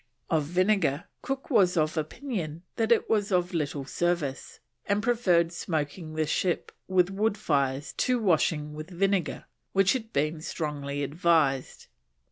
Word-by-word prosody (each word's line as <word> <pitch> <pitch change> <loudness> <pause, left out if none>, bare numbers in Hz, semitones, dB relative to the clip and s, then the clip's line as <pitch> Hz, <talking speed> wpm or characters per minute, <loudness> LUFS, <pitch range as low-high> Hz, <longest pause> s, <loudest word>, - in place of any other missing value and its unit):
Of 155 -3 +2
vinegar, 180 -3 +2 0.2
Cook 270 +2 -4
was 190 -7 +4
of 155 0 +1
opinion 165 - -4
that 225 0 0
it 235 - +4
was 210 -2 +1
of 180 0 +1
little 145 -4 -2
service, 165 -3 -2 0.3
and 205 +1 +1
preferred 185 -9 +3
smoking 155 -1 -3
the 155 0 +1
ship 175 +3 -1 0.2
with 185 0 +3
wood 210 +2 0
fires 140 -6 0
to 250 -1 +2
washing 160 -6 +1
with 155 +3 -7
vinegar, 185 -4 0 0.3
which 195 0 +4
had 230 -4 -4
been 155 +2 0
strongly 145 -3 -3
advised. 145 -3 +1
170 Hz, 140 wpm, -28 LUFS, 150-195 Hz, 0.3 s, was